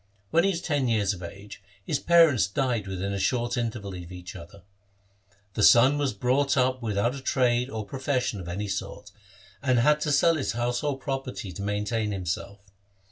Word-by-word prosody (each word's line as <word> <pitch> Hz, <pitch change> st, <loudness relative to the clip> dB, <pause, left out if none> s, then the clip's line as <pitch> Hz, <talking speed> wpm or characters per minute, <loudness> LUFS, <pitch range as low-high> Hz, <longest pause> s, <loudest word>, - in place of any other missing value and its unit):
When 165 Hz, +1 st, +4 dB
he 195 Hz, -, +3 dB
was 175 Hz, -3 st, -2 dB
ten 145 Hz, -5 st, 0 dB
years 105 Hz, -4 st, +1 dB
of 90 Hz, -, -10 dB
age, 100 Hz, +4 st, -10 dB, 0.2 s
his 150 Hz, -, -1 dB
parents 160 Hz, -, +5 dB
died 115 Hz, -1 st, -1 dB
within 95 Hz, +1 st, -3 dB
a 100 Hz, -, -2 dB
short 120 Hz, +3 st, 0 dB
interval 110 Hz, -5 st, -3 dB
of 90 Hz, -1 st, -8 dB
each 90 Hz, -1 st, -9 dB
other. 90 Hz, +2 st, -12 dB, 0.9 s
The 105 Hz, -, -2 dB
son 130 Hz, +7 st, +6 dB
was 140 Hz, -2 st, +1 dB
brought 130 Hz, +7 st, +1 dB
up 130 Hz, 0 st, +1 dB
without 110 Hz, +1 st, 0 dB
a 140 Hz, -, -7 dB
trade 125 Hz, -1 st, +1 dB
or 110 Hz, -4 st, -5 dB
profession 130 Hz, -3 st, -2 dB
of 90 Hz, -, -8 dB
any 100 Hz, +4 st, -3 dB
sort, 95 Hz, -, -5 dB, 0.5 s
and 130 Hz, -3 st, +2 dB
had 150 Hz, +5 st, +3 dB
to 150 Hz, -, 0 dB
sell 165 Hz, +3 st, +4 dB
his 140 Hz, -, -2 dB
household 125 Hz, +4 st, -2 dB
property 135 Hz, -7 st, -4 dB
to 100 Hz, -, -7 dB
maintain 105 Hz, +2 st, -1 dB
himself. 100 Hz, +2 st, -4 dB
120 Hz, 185 wpm, -26 LUFS, 100-135 Hz, 0.9 s, son